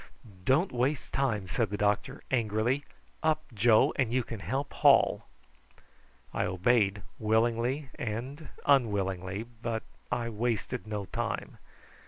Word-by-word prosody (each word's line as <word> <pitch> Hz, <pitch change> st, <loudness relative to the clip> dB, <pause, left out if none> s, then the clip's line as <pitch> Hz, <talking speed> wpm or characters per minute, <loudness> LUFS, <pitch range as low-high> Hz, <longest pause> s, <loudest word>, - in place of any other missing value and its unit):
"Don't 155 Hz, +9 st, +3 dB
waste 130 Hz, +3 st, -1 dB
time," 115 Hz, -8 st, 0 dB
said 110 Hz, +3 st, 0 dB
the 105 Hz, -, -3 dB
doctor 105 Hz, 0 st, 0 dB
angrily. 120 Hz, +3 st, +1 dB, 0.4 s
"Up, 155 Hz, 0 st, +2 dB
Joe, 115 Hz, +6 st, +4 dB
and 130 Hz, -5 st, +1 dB
you 125 Hz, 0 st, +2 dB
can 115 Hz, -2 st, -7 dB
help 135 Hz, +8 st, -3 dB
haul." -, -, +4 dB, 1.1 s
I -, -, 0 dB
obeyed 100 Hz, +2 st, +2 dB, 0.2 s
willingly 115 Hz, +5 st, +1 dB
and 130 Hz, +7 st, -4 dB, 0.2 s
unwillingly, 100 Hz, -7 st, +1 dB, 0.2 s
but 115 Hz, -1 st, -2 dB, 0.3 s
I 120 Hz, -1 st, 0 dB
wasted 115 Hz, +1 st, -2 dB
no 105 Hz, -2 st, -3 dB
time. -, -, -4 dB
115 Hz, 120 wpm, -30 LUFS, 105-130 Hz, 1.1 s, Joe